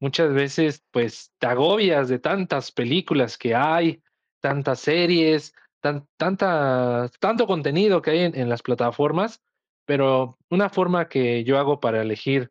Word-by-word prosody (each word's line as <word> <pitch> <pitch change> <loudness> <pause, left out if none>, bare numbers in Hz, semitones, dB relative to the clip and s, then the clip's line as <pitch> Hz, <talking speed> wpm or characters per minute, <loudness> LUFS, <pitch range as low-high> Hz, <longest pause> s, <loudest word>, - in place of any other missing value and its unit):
muchas 140 +2 +1
veces, 140 +2 0
pues, 115 -2 -4
te - - -1
agobias 145 - +3
de 130 -1 0
tantas 145 -3 -2
películas 140 -3 0
que 120 -2 -1
hay, 160 +3 +2 0.4
tantas 140 -2 -2
series, 155 -1 +2 0.3
tan 145 0 -3
tantas 140 -10 0
tanto 230 +1 +2
contenido 180 +1 +2
que - - -1
hay 160 - +3
en 170 -5 0
en 125 -2 -2
las 120 0 -3
plataformas, 145 - -1 0.5
pero 130 -3 +1
una 200 +3 +2
forma 180 -3 0
que 120 -4 0
yo 135 +3 +2
hago 140 0 +1
para 115 -3 0
elegir, 120 +4 -2
145 Hz, 145 wpm, -22 LUFS, 125-170 Hz, 0.5 s, agobias